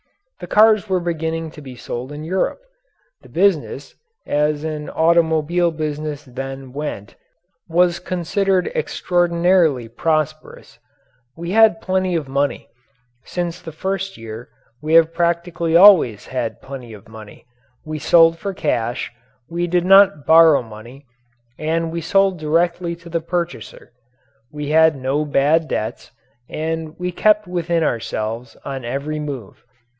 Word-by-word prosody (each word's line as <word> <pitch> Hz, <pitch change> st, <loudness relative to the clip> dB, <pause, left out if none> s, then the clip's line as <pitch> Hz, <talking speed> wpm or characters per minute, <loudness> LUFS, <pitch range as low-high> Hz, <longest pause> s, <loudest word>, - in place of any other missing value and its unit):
The -, -, -8 dB
cars 215 Hz, -1 st, +4 dB
were 185 Hz, -1 st, +1 dB
beginning 165 Hz, -1 st, -3 dB
to 150 Hz, -, -12 dB
be 130 Hz, -3 st, -10 dB
sold 120 Hz, +2 st, -6 dB
in 150 Hz, +1 st, -7 dB
Europe. 185 Hz, -, -1 dB, 0.6 s
The -, -, -17 dB
business, 165 Hz, -6 st, 0 dB, 0.3 s
as 150 Hz, 0 st, 0 dB
an 155 Hz, -1 st, -4 dB
automobile 165 Hz, +1 st, +2 dB
business 150 Hz, -2 st, -4 dB
then 135 Hz, 0 st, -7 dB
went, 140 Hz, -9 st, -6 dB, 0.6 s
was 175 Hz, +1 st, +2 dB
considered 185 Hz, +1 st, 0 dB
extraordinarily 175 Hz, -6 st, +1 dB
prosperous. 155 Hz, +5 st, -3 dB, 0.6 s
We 170 Hz, +1 st, -5 dB
had 220 Hz, +1 st, +5 dB
plenty 185 Hz, -1 st, 0 dB
of 155 Hz, -4 st, -2 dB
money. 140 Hz, +1 st, -1 dB, 0.6 s
Since 175 Hz, 0 st, -4 dB
the 165 Hz, -, -8 dB
first 195 Hz, +4 st, -4 dB
year 115 Hz, +1 st, -9 dB, 0.3 s
we 155 Hz, +2 st, +1 dB
have 165 Hz, 0 st, +5 dB
practically 170 Hz, -1 st, -1 dB
always 175 Hz, -, +6 dB
had 125 Hz, -3 st, -4 dB
plenty 130 Hz, -4 st, -9 dB
of 105 Hz, -2 st, -14 dB
money. 110 Hz, -2 st, -13 dB, 0.4 s
We 155 Hz, 0 st, -5 dB
sold 165 Hz, +1 st, +4 dB
for 200 Hz, -2 st, -4 dB
cash, 120 Hz, -6 st, -2 dB, 0.4 s
we 175 Hz, +1 st, -2 dB
did 175 Hz, 0 st, +1 dB
not 195 Hz, -6 st, +5 dB
borrow 160 Hz, -3 st, +6 dB
money, 115 Hz, +5 st, -13 dB, 0.5 s
and 165 Hz, +1 st, -1 dB
we 170 Hz, 0 st, -4 dB
sold 195 Hz, +2 st, +2 dB
directly 170 Hz, +2 st, 0 dB
to 170 Hz, 0 st, -14 dB
the 165 Hz, 0 st, -1 dB
purchaser. 175 Hz, -5 st, -5 dB, 0.6 s
We 150 Hz, -1 st, -5 dB
had 160 Hz, 0 st, +5 dB
no 135 Hz, +3 st, -1 dB
bad 150 Hz, +3 st, +2 dB
debts 110 Hz, -, -4 dB, 0.4 s
and 160 Hz, 0 st, -4 dB
we 180 Hz, 0 st, -3 dB
kept 210 Hz, +3 st, +3 dB
within 170 Hz, -2 st, -1 dB
ourselves 115 Hz, -2 st, -3 dB
on 135 Hz, -2 st, -5 dB
every 140 Hz, +5 st, -4 dB
move. 140 Hz, -8 st, -7 dB
160 Hz, 135 wpm, -20 LUFS, 140-175 Hz, 0.6 s, always